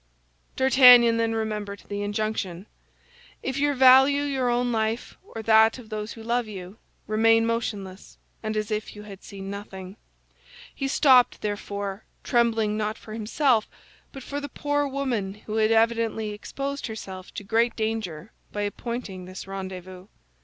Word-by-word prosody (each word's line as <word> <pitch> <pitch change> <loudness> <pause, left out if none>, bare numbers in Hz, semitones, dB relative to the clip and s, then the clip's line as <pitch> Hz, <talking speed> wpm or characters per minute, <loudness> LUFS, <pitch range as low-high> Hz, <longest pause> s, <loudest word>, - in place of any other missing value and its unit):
D'Artagnan 250 -3 +7
then 225 0 0
remembered 210 -2 -4
the 205 0 -4
injunction: 205 -3 -3 0.8
"If 265 +1 -2
you 290 0 +2
value 265 +2 +6
your 265 -3 0
own 245 0 +1
life 225 +1 -2
or 225 - -9
that 220 +1 +5
of 235 -4 -12
those 215 0 -5
who 225 - -11
love 235 0 0
you, 195 0 -9 0.3
remain 225 +1 +3
motionless, 205 -5 -4 0.2
and 215 -1 -3
as 215 +1 -2
if 215 0 -3
you 210 - -9
had 200 -2 -11
seen 195 -1 -8
nothing." 195 -1 -8 0.8
He 275 - -3
stopped, 260 -3 +4
therefore, 205 -1 -4 0.2
trembling 225 -3 +1
not 215 0 -2
for 215 - -11
himself 225 +1 +1 0.4
but 270 - -9
for 285 +2 -5
the 285 - -6
poor 290 +1 -1
woman 250 -8 -2
who 215 +1 -3
had 215 0 +3
evidently 225 -1 +1
exposed 275 +7 -5
herself 190 -4 -8
to - - -5
great 230 +4 +1
danger 220 -6 -3 0.2
by 205 - -3
appointing 205 -3 -5
this 185 +1 -8
rendezvous. 185 -1 -8
220 Hz, 150 wpm, -25 LUFS, 205-245 Hz, 0.8 s, D'Artagnan